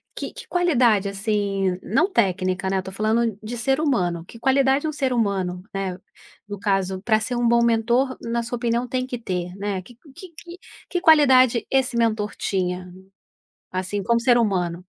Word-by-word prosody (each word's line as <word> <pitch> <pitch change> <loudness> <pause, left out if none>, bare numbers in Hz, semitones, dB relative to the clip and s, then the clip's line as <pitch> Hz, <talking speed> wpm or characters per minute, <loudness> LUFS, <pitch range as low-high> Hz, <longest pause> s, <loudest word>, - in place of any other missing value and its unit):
que - - -6
que - - -10
qualidade, 245 - +2
assim, 195 -2 -1
não 320 - +1
técnica, 190 - 0
né, 195 - 0
eu - - +1
estou 190 0 -7
falando 220 +1 0
de 225 +3 -6
ser 270 +4 +1
humano, 180 - 0
que 230 - -13
qualidade 270 +3 +2
um 310 - -1
ser 270 -4 -1
humano, 190 -5 -1
né, 190 -2 -3 0.5
no 205 -1 -7
caso, 195 -2 -1
pra 215 +1 +2
ser 245 +3 -3
um 240 -1 +1
bom 235 0 +4
mentor, 235 +3 +1
na 235 0 -2
sua 240 +1 -4
opinião, 235 +1 -1
tem 255 +1 -2
que 250 - -4
ter, 180 -5 -4
né, 200 -1 -3
que 240 +6 -16 0.2
que 370 - -11
que 345 +3 -11 0.3
que 355 - -2
qualidade 260 -7 +5
esse 265 -2 +1
mentor 220 -2 0
tinha? 180 -1 -2 0.8
Assim, 190 +2 -3
como 235 +2 +1
ser 240 0 +4
humano. 180 -5 -1
225 Hz, 180 wpm, -23 LUFS, 190-250 Hz, 0.8 s, qualidade